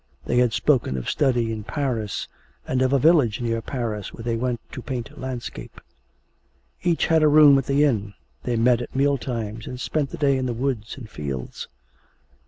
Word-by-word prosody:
They 120 Hz, -, 0 dB
had 125 Hz, -2 st, +3 dB
spoken 115 Hz, -, +1 dB
of 65 Hz, -, -5 dB
study 120 Hz, -5 st, +1 dB
in 110 Hz, -1 st, -4 dB
Paris, 120 Hz, -6 st, -2 dB, 0.4 s
and 130 Hz, 0 st, 0 dB
of 130 Hz, 0 st, +2 dB
a 140 Hz, -, +4 dB
village 140 Hz, -7 st, +4 dB
near 115 Hz, -1 st, -1 dB
Paris 110 Hz, -4 st, -4 dB
where 115 Hz, -, -10 dB
they 115 Hz, 0 st, -1 dB
went 120 Hz, 0 st, -1 dB
to -, -, -7 dB
paint 120 Hz, -4 st, -5 dB
landscape. 130 Hz, -2 st, -7 dB, 1.0 s
Each 175 Hz, -2 st, +1 dB
had 160 Hz, -1 st, +3 dB
a 155 Hz, -, +5 dB
room 150 Hz, -1 st, +8 dB
at 135 Hz, -, -5 dB
the 140 Hz, +1 st, +3 dB
inn; 105 Hz, -8 st, 0 dB, 0.3 s
they 120 Hz, -, -1 dB
met 120 Hz, +1 st, +3 dB
at 120 Hz, -, -8 dB
meal 140 Hz, 0 st, +2 dB
times, 115 Hz, -3 st, -4 dB
and 125 Hz, -, -6 dB
spent 145 Hz, +1 st, -1 dB
the -, -, -7 dB
day 140 Hz, -3 st, +2 dB
in 130 Hz, -1 st, -1 dB
the 120 Hz, -, -2 dB
woods 120 Hz, -3 st, -2 dB
and 125 Hz, -5 st, -9 dB
fields. 70 Hz, -, -6 dB
125 Hz, 190 wpm, -24 LUFS, 115-140 Hz, 1.0 s, room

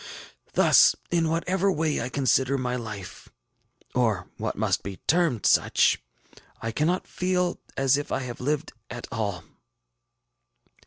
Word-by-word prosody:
Thus, -, -, +6 dB, 0.2 s
in 165 Hz, -2 st, +2 dB
whatever 185 Hz, +4 st, +1 dB
way 160 Hz, -3 st, 0 dB
I 125 Hz, -, -3 dB
consider 135 Hz, 0 st, +2 dB
my 125 Hz, -1 st, -2 dB
life, 105 Hz, -6 st, -7 dB, 0.6 s
or 110 Hz, -8 st, 0 dB
what -, -, -3 dB
must -, -, 0 dB
be 100 Hz, -2 st, -7 dB
termed 165 Hz, -10 st, +2 dB
such, -, -, +3 dB, 0.6 s
I 115 Hz, -, -3 dB
cannot 160 Hz, +9 st, 0 dB
feel 180 Hz, -1 st, -1 dB, 0.2 s
as 135 Hz, 0 st, +3 dB
if 145 Hz, -, -5 dB
I 135 Hz, -, 0 dB
had 125 Hz, -2 st, -6 dB
lived 150 Hz, +4 st, -2 dB, 0.2 s
at 120 Hz, 0 st, -6 dB
all. 105 Hz, -6 st, -3 dB
135 Hz, 135 wpm, -26 LUFS, 115-165 Hz, 0.6 s, Thus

